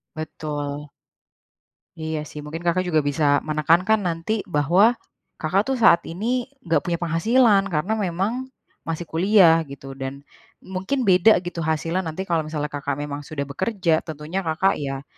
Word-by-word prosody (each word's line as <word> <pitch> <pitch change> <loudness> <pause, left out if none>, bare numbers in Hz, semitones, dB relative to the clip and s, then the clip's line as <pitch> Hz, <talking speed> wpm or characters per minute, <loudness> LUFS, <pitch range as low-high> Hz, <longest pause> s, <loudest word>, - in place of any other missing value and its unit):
Betul. 150 -2 -5 1.1
Iya 160 -1 -3
sih, 150 0 -9
mungkin 150 +3 -7
Kakak 180 +1 +1
juga 155 -4 +2
bisa 145 0 +2
menekankan 165 +7 +2
nanti 170 +6 -2
bahwa 180 - +3 0.4
Kakak 185 +7 0
tuh, 270 - +1
saat 170 -6 +7
ini 235 +9 -2 0.2
nggak 165 -2 +2
punya 175 - +1
penghasilan, 200 +5 +3
karena 180 +4 -1
memang 205 +7 -2 0.4
masih 165 +1 -3
kuliah, 175 -1 +5
gitu, 135 0 -9
dan 135 +1 -6 0.4
mungkin 190 +9 -2
beda, 190 +1 +6
gitu, 175 -1 -6
hasilnya 165 +2 -1
nanti 160 +4 -4
kalau 170 -4 -1
misalnya 150 -1 -3
Kakak 140 -1 -3
memang 145 0 -5
sudah 145 -2 -3
bekerja, 170 +3 0
tentunya 155 +4 -4
Kakak, 185 +2 +1
ya, 135 -1 -4
165 Hz, 145 wpm, -23 LUFS, 150-190 Hz, 1.1 s, saat